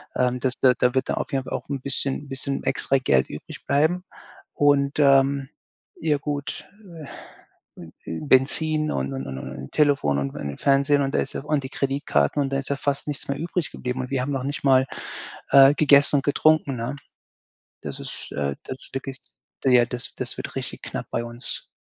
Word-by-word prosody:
Ähm, 125 Hz, 0 st, +1 dB
das 130 Hz, -1 st, +1 dB
da 130 Hz, -1 st, +6 dB
da 125 Hz, +1 st, +2 dB
wird 130 Hz, -, 0 dB
dann -, -, 0 dB
auf -, -, -3 dB
jeden 135 Hz, -1 st, 0 dB
Fall -, -, -6 dB
auch -, -, -4 dB
'n 140 Hz, -2 st, -3 dB
bisschen 135 Hz, 0 st, 0 dB
'n -, -, -15 dB
bisschen 135 Hz, +1 st, -2 dB
extra 135 Hz, -, +1 dB
Geld 65 Hz, -, +2 dB
übrig -, -, -9 dB
bleiben, 160 Hz, +6 st, +2 dB, 0.5 s
und, 145 Hz, -1 st, +3 dB
ähm 135 Hz, -1 st, +4 dB, 0.5 s
ja, 150 Hz, -3 st, +2 dB
gut. 145 Hz, -1 st, -4 dB, 1.1 s
Äh -, -, -10 dB
äh 80 Hz, -1 st, -11 dB
hm, 80 Hz, -, -5 dB
Benzin 155 Hz, +4 st, +2 dB
und 70 Hz, +1 st, -2 dB
und 65 Hz, 0 st, -4 dB
und 65 Hz, 0 st, -5 dB
und 65 Hz, 0 st, -8 dB
Telefon 140 Hz, -, +2 dB
und 70 Hz, 0 st, -3 dB
wegen 70 Hz, -1 st, -5 dB
Fernsehen 140 Hz, +1 st, +3 dB
und 135 Hz, 0 st, -1 dB
da -, -, +3 dB
ist 135 Hz, -, -2 dB
ja -, -, -3 dB
auch -, -, -16 dB
und 150 Hz, -2 st, 0 dB
die 130 Hz, -, -6 dB
Kreditkarten 135 Hz, -, 0 dB
und 135 Hz, -, 0 dB
dann 135 Hz, -, 0 dB
ist 135 Hz, -, -6 dB
ja 140 Hz, -, +1 dB
fast 140 Hz, +1 st, -1 dB
nichts 145 Hz, -, -3 dB
mehr 140 Hz, -, -1 dB
übrig 170 Hz, 0 st, -2 dB
geblieben. 125 Hz, +1 st, -4 dB
Und 130 Hz, +2 st, -6 dB
wir 130 Hz, -2 st, 0 dB
haben 145 Hz, +3 st, -2 dB
noch 130 Hz, -1 st, -2 dB
nicht 145 Hz, +1 st, -4 dB
mal, 130 Hz, -1 st, +5 dB, 0.6 s
äh, 135 Hz, +1 st, +8 dB
gegessen 145 Hz, -1 st, +5 dB
und 140 Hz, -, 0 dB
getrunken, 150 Hz, -2 st, +3 dB
ne? 120 Hz, +4 st, -3 dB, 0.9 s
Das -, -, -6 dB
ist -, -, -4 dB
äh, 70 Hz, -1 st, -2 dB
das 130 Hz, -, -5 dB
ist -, -, -16 dB
wirklich 135 Hz, 0 st, -2 dB, 0.5 s
ja, 125 Hz, -2 st, +6 dB
das 125 Hz, 0 st, -4 dB
das -, -, -4 dB
wird -, -, -7 dB
richtig -, -, -4 dB
knapp -, -, -5 dB
bei 120 Hz, -, -2 dB
uns. 120 Hz, +1 st, -5 dB
135 Hz, 210 wpm, -24 LUFS, 125-145 Hz, 1.1 s, äh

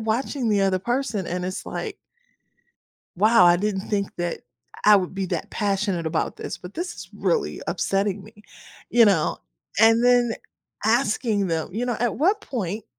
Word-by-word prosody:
watching 235 Hz, +3 st, -1 dB
the 205 Hz, -2 st, +2 dB
other 190 Hz, -1 st, +2 dB
person 240 Hz, -2 st, -2 dB
and 180 Hz, +1 st, -3 dB
it's, 185 Hz, +1 st, -4 dB
like -, -, -5 dB, 1.2 s
"Wow, 215 Hz, 0 st, +5 dB
I 175 Hz, 0 st, +6 dB
didn't 195 Hz, 0 st, -2 dB
think 200 Hz, -2 st, -1 dB
that 175 Hz, -1 st, -3 dB, 0.4 s
I 210 Hz, -1 st, +8 dB
would 185 Hz, -1 st, -2 dB
be 190 Hz, -1 st, -2 dB
that -, -, -4 dB
passionate 195 Hz, -4 st, -1 dB
about 160 Hz, 0 st, -1 dB
this, -, -, -6 dB
but 180 Hz, +2 st, -11 dB
this 350 Hz, +2 st, -4 dB
is -, -, -10 dB
really 475 Hz, -, -1 dB
upsetting 195 Hz, 0 st, -1 dB
me," 210 Hz, +1 st, -16 dB, 0.5 s
you 235 Hz, 0 st, +6 dB
know, 185 Hz, -7 st, +2 dB, 0.4 s
and 225 Hz, +2 st, +5 dB
then 245 Hz, -2 st, +4 dB, 0.5 s
asking 220 Hz, -3 st, +1 dB
them, 160 Hz, -1 st, -1 dB
you 230 Hz, +5 st, -2 dB
know, 240 Hz, -2 st, -1 dB
"At 240 Hz, -2 st, 0 dB
what 385 Hz, +8 st, +2 dB
point 215 Hz, -4 st, -4 dB
210 Hz, 165 wpm, -24 LUFS, 190-235 Hz, 1.2 s, I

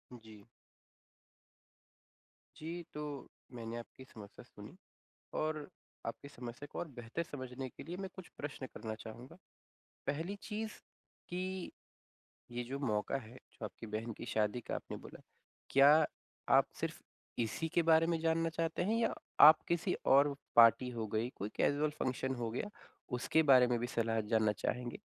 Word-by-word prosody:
जी। 110 Hz, -3 st, -14 dB, 2.1 s
जी, 170 Hz, +2 st, -5 dB
तो 150 Hz, -2 st, -5 dB, 0.2 s
मैंने 115 Hz, -1 st, -5 dB
आपकी 120 Hz, +2 st, -10 dB
समस्या 105 Hz, -5 st, -12 dB
सुनी -, -, -12 dB, 0.7 s
और 155 Hz, 0 st, 0 dB, 0.5 s
आपकी 140 Hz, +5 st, -5 dB
समस्या 125 Hz, +1 st, -8 dB
को -, -, -5 dB
और 175 Hz, -, -3 dB
बेहतर 120 Hz, +8 st, -3 dB
समझने 130 Hz, -3 st, -6 dB
के -, -, -11 dB
लिए 175 Hz, +2 st, -5 dB
मैं 190 Hz, 0 st, -4 dB
कुछ 190 Hz, -3 st, -10 dB
प्रश्न 140 Hz, -2 st, -5 dB
करना 110 Hz, -2 st, -4 dB
चाहूँगा। 125 Hz, +9 st, -9 dB, 0.7 s
पहली 165 Hz, +7 st, -1 dB
चीज़ 215 Hz, 0 st, -3 dB, 0.6 s
कि 185 Hz, +1 st, -3 dB, 0.8 s
ये 120 Hz, 0 st, -3 dB
जो 135 Hz, +3 st, -4 dB
मौका 115 Hz, -1 st, 0 dB
है, 120 Hz, -2 st, -8 dB
जो 115 Hz, -, -12 dB
आपकी 115 Hz, +2 st, -7 dB
बहन 110 Hz, +2 st, -3 dB
की 120 Hz, -, -6 dB
शादी 110 Hz, +2 st, +1 dB
का -, -, -2 dB
आपने -, -, -5 dB
बोला, -, -, -11 dB, 0.5 s
क्या 140 Hz, +1 st, +8 dB, 0.7 s
आप -, -, +4 dB
सिर्फ -, -, -2 dB, 0.4 s
इसी 120 Hz, +8 st, -1 dB
के 170 Hz, -, +5 dB
बारे 165 Hz, 0 st, +5 dB
में 165 Hz, -1 st, +1 dB
जानना 165 Hz, 0 st, +2 dB
चाहते 165 Hz, +1 st, -1 dB
हैं 215 Hz, +5 st, +1 dB
या 230 Hz, -, +2 dB, 0.3 s
आप 155 Hz, 0 st, +10 dB
किसी 170 Hz, -1 st, +1 dB, 0.2 s
और 140 Hz, +1 st, +6 dB, 0.2 s
पार्टी 115 Hz, +2 st, +8 dB
हो 115 Hz, -2 st, -3 dB
गई, 115 Hz, +3 st, +1 dB
कोई 100 Hz, -, -3 dB
कैज़ुअल 145 Hz, +1 st, +2 dB
फ़ंक्शन 130 Hz, +1 st, -1 dB
हो 120 Hz, -2 st, -2 dB
गया, 130 Hz, -, -3 dB, 0.5 s
उसके 160 Hz, +6 st, +3 dB
बारे 125 Hz, -1 st, +8 dB
में 120 Hz, -1 st, +1 dB
भी 120 Hz, -, 0 dB
सलाह 115 Hz, -2 st, 0 dB
जानना 110 Hz, -2 st, +4 dB
चाहेंगे? 125 Hz, +8 st, -1 dB
130 Hz, 155 wpm, -35 LUFS, 115-160 Hz, 2.1 s, आप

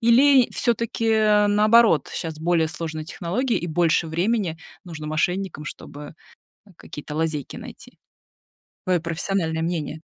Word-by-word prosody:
Или, 255 Hz, +2 st, +5 dB
всё-таки, 230 Hz, -1 st, 0 dB
а, 210 Hz, -1 st, +4 dB
наоборот, 215 Hz, -3 st, +4 dB
щас 160 Hz, -2 st, -5 dB
более 160 Hz, -1 st, +1 dB
сложные 160 Hz, 0 st, -5 dB
технологии, 200 Hz, +9 st, -2 dB
и 175 Hz, -, -5 dB
больше 165 Hz, 0 st, +1 dB
времени 175 Hz, +1 st, -1 dB, 0.3 s
нужно 160 Hz, -4 st, -7 dB
мошенникам, 180 Hz, +1 st, -2 dB
чтобы 150 Hz, 0 st, -9 dB, 0.6 s
какие-то 150 Hz, -1 st, -9 dB
лазейки 155 Hz, -3 st, -2 dB
найти? -, -, -11 dB, 0.9 s
Твое 180 Hz, -1 st, +2 dB
профессиональное 165 Hz, 0 st, -2 dB
мнение. 160 Hz, -2 st, -3 dB
170 Hz, 120 wpm, -23 LUFS, 160-210 Hz, 0.9 s, Или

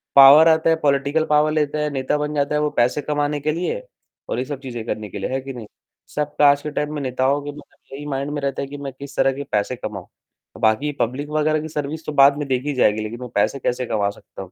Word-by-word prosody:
Power 140 Hz, +4 st, +9 dB
आता 160 Hz, 0 st, +4 dB
है, 160 Hz, -, +4 dB
political 140 Hz, +2 st, +2 dB
power 150 Hz, +1 st, +3 dB
लेता 150 Hz, -1 st, 0 dB
है, 150 Hz, 0 st, 0 dB
नेता 135 Hz, +1 st, -1 dB
बन 150 Hz, 0 st, -2 dB
जाता 145 Hz, +1 st, 0 dB
है, 150 Hz, -, +1 dB
वो 150 Hz, -, +1 dB
पैसे 125 Hz, +5 st, +2 dB
कमाने 145 Hz, 0 st, -1 dB
के 155 Hz, +2 st, 0 dB
लिए 180 Hz, -, -3 dB, 0.5 s
और -, -, -1 dB
ये 130 Hz, -, -2 dB
सब 140 Hz, -1 st, -5 dB
चीज़ें 120 Hz, -4 st, -6 dB
करने 105 Hz, -3 st, -4 dB
के -, -, -7 dB
लिए, -, -, -3 dB
है 135 Hz, +1 st, -1 dB
कि 135 Hz, 0 st, -7 dB
नहीं? 115 Hz, -4 st, -9 dB, 0.5 s
सबका 150 Hz, -1 st, +3 dB
आज 140 Hz, 0 st, -1 dB
के 150 Hz, -, -5 dB
टाइम 150 Hz, +1 st, -2 dB
में 145 Hz, -, -3 dB
नेताओं 130 Hz, +2 st, 0 dB
के 145 Hz, -, -7 dB, 0.5 s
यही 145 Hz, +1 st, -8 dB
माइंड 140 Hz, 0 st, -3 dB
में 145 Hz, -1 st, -3 dB
रहता 140 Hz, -1 st, -2 dB
है 140 Hz, -, -4 dB
कि 145 Hz, +1 st, -8 dB
मैं 140 Hz, -1 st, -6 dB
किस 140 Hz, +1 st, -10 dB
तरह 135 Hz, -, +3 dB
से 140 Hz, -, -5 dB
पैसे 105 Hz, +4 st, 0 dB
कमाऊँ। 105 Hz, -3 st, -7 dB, 0.5 s
बाकी 115 Hz, +7 st, +2 dB
पब्लिक 135 Hz, +5 st, -2 dB
वगैरह 155 Hz, 0 st, +1 dB
की 155 Hz, -, -5 dB
सर्विस 150 Hz, +1 st, -4 dB
तो 150 Hz, -, -3 dB
बाद 140 Hz, 0 st, +6 dB
में 145 Hz, -2 st, -3 dB
देखी 135 Hz, +3 st, -1 dB
जाएगी, 110 Hz, -4 st, +2 dB
लेकिन 115 Hz, +3 st, -6 dB
मैं 125 Hz, -, -6 dB
पैसे 120 Hz, +7 st, +1 dB
कैसे 125 Hz, +1 st, -1 dB
कमा 105 Hz, -3 st, 0 dB
सकता 100 Hz, -, -11 dB
हूँ। 95 Hz, -, -10 dB
140 Hz, 255 wpm, -21 LUFS, 130-150 Hz, 0.5 s, Power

